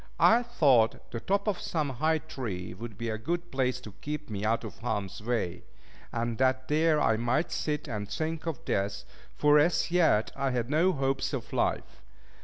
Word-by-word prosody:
I 230 Hz, +2 st, +6 dB
thought 140 Hz, -, +2 dB
the 115 Hz, -, -3 dB
top 200 Hz, -, 0 dB
of 200 Hz, -4 st, 0 dB
some 155 Hz, -4 st, -1 dB
high 155 Hz, +5 st, +1 dB
tree 115 Hz, -, -5 dB
would 110 Hz, +2 st, -8 dB
be 115 Hz, +1 st, -3 dB
a 110 Hz, -1 st, -3 dB
good 175 Hz, +9 st, -3 dB
place 130 Hz, -1 st, 0 dB
to 110 Hz, -, -9 dB
keep 150 Hz, -3 st, -5 dB
me 100 Hz, -1 st, -3 dB
out 115 Hz, +2 st, +1 dB
of -, -, -8 dB
harm's 105 Hz, -5 st, -3 dB
way; 110 Hz, -6 st, -2 dB, 0.5 s
and 115 Hz, 0 st, -2 dB
that 130 Hz, 0 st, +2 dB
there 155 Hz, +1 st, +3 dB
I 110 Hz, -6 st, +3 dB
might 120 Hz, +8 st, 0 dB
sit 150 Hz, -1 st, -2 dB
and 105 Hz, -2 st, -4 dB
think 160 Hz, +1 st, -3 dB
of 160 Hz, -6 st, -4 dB
death, 100 Hz, 0 st, -1 dB, 0.3 s
for, 150 Hz, 0 st, +5 dB
as 170 Hz, +2 st, +2 dB
yet, 165 Hz, -12 st, +3 dB
I 135 Hz, 0 st, 0 dB
had 125 Hz, 0 st, -2 dB
no 165 Hz, +5 st, +4 dB
hopes 135 Hz, -3 st, -1 dB
of -, -, -5 dB
life. -, -, -1 dB
130 Hz, 190 wpm, -29 LUFS, 115-155 Hz, 0.5 s, I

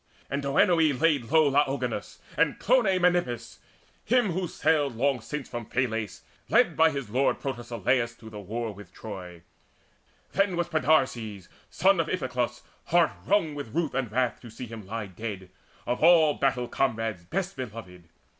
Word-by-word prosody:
And 140 Hz, +1 st, -1 dB
Derinoe 150 Hz, +1 st, +3 dB
laid 150 Hz, -6 st, +2 dB
low 155 Hz, -1 st, +4 dB
Laogonus, 140 Hz, 0 st, -1 dB, 0.2 s
And -, -, +2 dB
Clonie -, -, +3 dB
Menippus, 175 Hz, -9 st, 0 dB, 0.4 s
him 240 Hz, -5 st, +2 dB
who 180 Hz, +1 st, -2 dB
sailed 150 Hz, -5 st, +1 dB
Long 130 Hz, +1 st, +1 dB
since 150 Hz, +5 st, -5 dB
from 120 Hz, -2 st, -6 dB
Phylace, 115 Hz, -5 st, -2 dB, 0.3 s
led -, -, +4 dB
by 160 Hz, 0 st, +5 dB
his 140 Hz, -8 st, -5 dB
lord 130 Hz, +4 st, +1 dB
Protesilaus 120 Hz, -2 st, -1 dB
to 110 Hz, -1 st, -13 dB
the 105 Hz, -, -8 dB
war 110 Hz, +3 st, -4 dB
with 100 Hz, -3 st, -13 dB
Troy. 90 Hz, -6 st, -9 dB, 0.9 s
Then 195 Hz, -1 st, +1 dB
was 175 Hz, 0 st, -1 dB
Podarces, 125 Hz, -, +1 dB, 0.2 s
son 190 Hz, +1 st, +3 dB
of 165 Hz, -, +1 dB
Iphiclus, 125 Hz, -7 st, -2 dB, 0.2 s
Heart 170 Hz, -1 st, +3 dB, 0.2 s
wrung 190 Hz, -7 st, +2 dB
with 140 Hz, -6 st, -7 dB
ruth 165 Hz, -3 st, 0 dB
and 125 Hz, -4 st, -2 dB
wrath 125 Hz, +1 st, 0 dB
to 120 Hz, -, -11 dB
see 115 Hz, +3 st, -8 dB
him 110 Hz, -4 st, -9 dB
lie 110 Hz, +1 st, -4 dB
Dead, 95 Hz, -1 st, -7 dB, 0.3 s
of 120 Hz, +1 st, -2 dB
all 160 Hz, -3 st, +6 dB
battle 130 Hz, -3 st, 0 dB
comrades 115 Hz, -9 st, -1 dB
best 190 Hz, -, -3 dB
beloved. 105 Hz, -8 st, -8 dB
130 Hz, 155 wpm, -27 LUFS, 115-160 Hz, 0.9 s, all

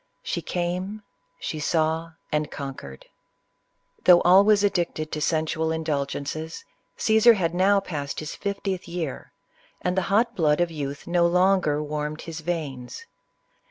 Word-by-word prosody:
She 485 Hz, 0 st, -2 dB
came, 185 Hz, +4 st, -3 dB, 0.2 s
— -, -, -46 dB
she 155 Hz, -, -4 dB
saw, 160 Hz, +1 st, 0 dB, 0.2 s
and 150 Hz, 0 st, 0 dB
conquered. 135 Hz, -, -8 dB, 1.0 s
Though 175 Hz, -1 st, +7 dB
al 185 Hz, +3 st, +8 dB
ways 205 Hz, -1 st, +4 dB
addicted 175 Hz, -5 st, 0 dB
to 155 Hz, -, -3 dB
sensual 160 Hz, +1 st, 0 dB
indulgences, 155 Hz, -, -3 dB, 0.3 s
Caesar 220 Hz, +1 st, +5 dB
had 170 Hz, -4 st, 0 dB
now 195 Hz, +3 st, +4 dB
passed 145 Hz, -7 st, -5 dB
his 155 Hz, 0 st, -5 dB
fiftieth 195 Hz, -2 st, -3 dB
year, 170 Hz, -5 st, -5 dB, 0.5 s
and 180 Hz, 0 st, -1 dB
the 190 Hz, -, +2 dB
hot 220 Hz, +5 st, +2 dB
blood 150 Hz, -3 st, +2 dB
of 175 Hz, -1 st, +1 dB
youth 145 Hz, -2 st, -5 dB
no 170 Hz, 0 st, +3 dB
longer 180 Hz, -4 st, +2 dB
warmed 150 Hz, +1 st, -4 dB
his 165 Hz, -1 st, -7 dB
veins. 155 Hz, -, -5 dB
165 Hz, 140 wpm, -25 LUFS, 150-185 Hz, 1.0 s, al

